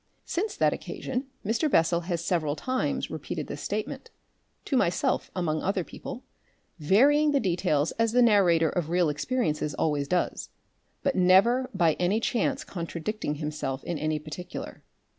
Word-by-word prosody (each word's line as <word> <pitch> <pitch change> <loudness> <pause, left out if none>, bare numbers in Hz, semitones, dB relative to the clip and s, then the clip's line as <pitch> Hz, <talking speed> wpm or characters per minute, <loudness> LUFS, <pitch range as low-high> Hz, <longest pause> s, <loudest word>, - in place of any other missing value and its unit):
Since 410 +5 -2
that - - +3
occasion 260 +1 -4 0.2
Mr. 230 +9 +1
Bessel 170 - +3
has 170 -1 -1
several 155 -5 0
times 255 +11 -2
repeated - - -4
this - - -7
statement - - -4 0.6
to 275 - -1
myself 175 -8 +1
among 155 -4 -1
other 195 -1 0
people 245 - -8 0.6
varying 285 - +4
the 280 - +4
details 175 - +1
as 225 -1 +3
the 245 +1 +5
narrator 180 -8 +4
of 170 -2 -2
real 175 -1 +2
experiences 150 - -1
always 145 -3 0
does, 180 +4 -1 0.5
but 275 - +1
never 200 +8 +4
by 170 -4 +3
any 180 +5 +2
chance 265 +5 0
contradicting 170 0 -4
himself 150 -3 -4
in 170 -3 -3
any 155 0 0
particular. 155 +4 -7
180 Hz, 145 wpm, -27 LUFS, 155-235 Hz, 0.6 s, the